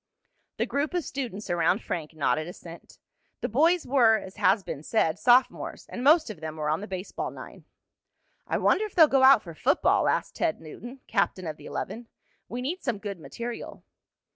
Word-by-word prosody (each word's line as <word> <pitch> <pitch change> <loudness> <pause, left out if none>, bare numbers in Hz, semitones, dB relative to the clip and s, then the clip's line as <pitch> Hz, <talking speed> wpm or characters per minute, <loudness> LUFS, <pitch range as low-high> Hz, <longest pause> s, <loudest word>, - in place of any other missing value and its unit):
The - - +1
group 290 +5 -2
of 350 - 0
students 235 -7 -5
around 175 +4 +1
Frank 160 -2 -5
nodded 155 +1 0
assent. 170 -1 -11 0.4
The - - -1
boys 325 +9 +3
were, 240 -4 +4
as 190 -3 -10
has 195 +2 +3
been 145 - -6
said, 165 -1 0
sophomores, 250 +1 +2
and 245 - -5
most 305 -2 +5
of 190 - -11
them 155 -1 -5
were 150 -1 -2
on 155 - -1
the 210 - -6
baseball 185 0 -5
nine. - - -11 0.8
"I - - 0
wonder 430 - +2
if 425 - -10
they'll 330 -3 +8
go 270 -2 +3
out 265 -3 +7
for 170 - -9
football?" - - +2
asked - - -1
Ted 330 -2 0
Newton, 240 - -10
captain 200 -3 0
of 155 -2 -5
the - - -12
eleven. 235 +1 -5 0.4
"We 245 +2 -4
need 345 +8 -3
some 240 -5 -2
good 200 -3 -6
material." 235 +8 -7
220 Hz, 190 wpm, -27 LUFS, 175-270 Hz, 0.8 s, they'll